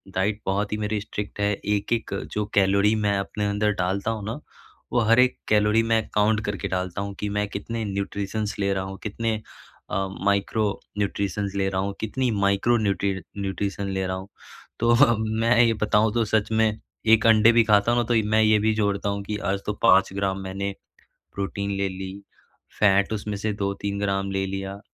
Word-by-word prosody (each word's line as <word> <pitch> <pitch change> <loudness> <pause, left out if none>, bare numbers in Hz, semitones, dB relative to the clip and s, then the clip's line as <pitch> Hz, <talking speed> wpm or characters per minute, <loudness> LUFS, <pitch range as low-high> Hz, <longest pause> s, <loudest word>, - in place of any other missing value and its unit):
diet 105 +2 0
बहुत 100 +2 -1
ही 105 - -1
मेरी 105 0 -1
strict 105 -1 -6
है 100 0 +2
एक-एक 105 +2 -2 0.2
जो 105 0 -1
कैलोरी 100 +1 +4
मैं 100 -1 +2
अपने 105 +1 -3
अंदर 105 +1 +1
डालता 100 +4 -1
हूँ 110 -2 -4
न, 115 - -4 0.5
वो 120 - +4
हर 115 +2 +6
एक 125 0 +4
कैलोरी 105 +1 +3
में 110 -1 +2
काउंट 105 +1 +2
करके 105 -1 -3
डालता 90 +1 -3
हूँ 100 0 -4
कि 105 - -2
मैं 105 0 0
कितने 115 +3 -4
न्यूट्रिशंस 100 +2 -3
ले 100 -1 +1
रहा 95 -1 -2
हूँ, 95 0 -7
कितने 115 +1 -1 0.5
अ, 95 0 -1 0.2
माइक्रो 100 +2 +1 0.3
न्यूट्रिशंस 100 -1 -2
ले 95 -1 +1
रहा 95 -1 -1
हूँ, 100 +1 -2
कितनी 125 +4 -1
माइक्रो 100 +5 +3
न्यूट्री 100 -2 0 0.2
न्यूट्रिशन 100 0 -3
ले 95 0 -1
रहा 95 - -2
हूँ 95 +1 -8 0.5
तो 120 0 +4 0.4
मैं 115 +2 +3
ये 115 -1 +4
बताऊँ 105 0 +3
तो 120 -1 +2
सच 110 0 0
में 110 0 +3 0.4
1 110 0 +4
अंडे 110 0 +6
भी 115 0 +5
खाता 105 +1 +3
हूँ 120 0 +3
न - - -7
तो 120 - +1 0.2
मैं 110 0 +4
ये 110 0 +5
भी 110 +1 +2
जोड़ता 100 -1 0
हूँ 100 0 -3
कि 105 +1 -3
आज 100 - -1
तो 105 - -1
5 95 -4 +6
ग्राम 95 -1 -1
मैंने 95 +1 -4 0.6
प्रोटीन 100 0 -3
ले 100 0 0
ली, 95 0 -6 0.7
फैट 100 0 +4
उसमें 105 -1 -3
से 105 +1 -2
2-3 100 0 -3
ग्राम 100 -1 -1
ले 95 0 -1
लिया 95 +1 -5
100 Hz, 195 wpm, -24 LUFS, 100-110 Hz, 0.7 s, हर